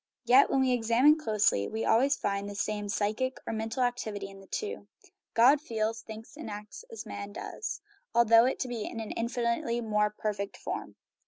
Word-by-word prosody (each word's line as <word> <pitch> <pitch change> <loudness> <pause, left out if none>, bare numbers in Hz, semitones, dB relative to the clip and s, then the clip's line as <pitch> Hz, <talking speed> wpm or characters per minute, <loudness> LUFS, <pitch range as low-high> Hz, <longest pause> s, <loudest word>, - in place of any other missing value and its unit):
Yet, 255 +4 +6
when 270 - +2
we 260 -1 +3
examine 250 +6 +4
closely, 210 - +2
we 220 +1 -3
always 270 +6 +4
find 200 -3 -2
the 205 - -7
same 210 0 -2
psychic 220 +5 -1
or - - -3
mental 225 +3 -1
activity 215 -5 -2
in 195 - -13
the 195 - -15
two. 435 -1 -4 0.5
God 265 +6 +6
feels, 225 -4 -2
thinks, 220 +3 -10
and 310 -6 -7
acts 210 - -8
as 455 - -7
man 200 0 -7
does, 430 - -5 0.3
although 230 0 +6
it 260 +1 0
be 235 -3 -4
in 230 - -6
an 220 - -5
infinitely 235 0 -1
more 210 -2 +1
perfect 205 -1 -4
form. - - -5
225 Hz, 180 wpm, -29 LUFS, 210-250 Hz, 0.5 s, Yet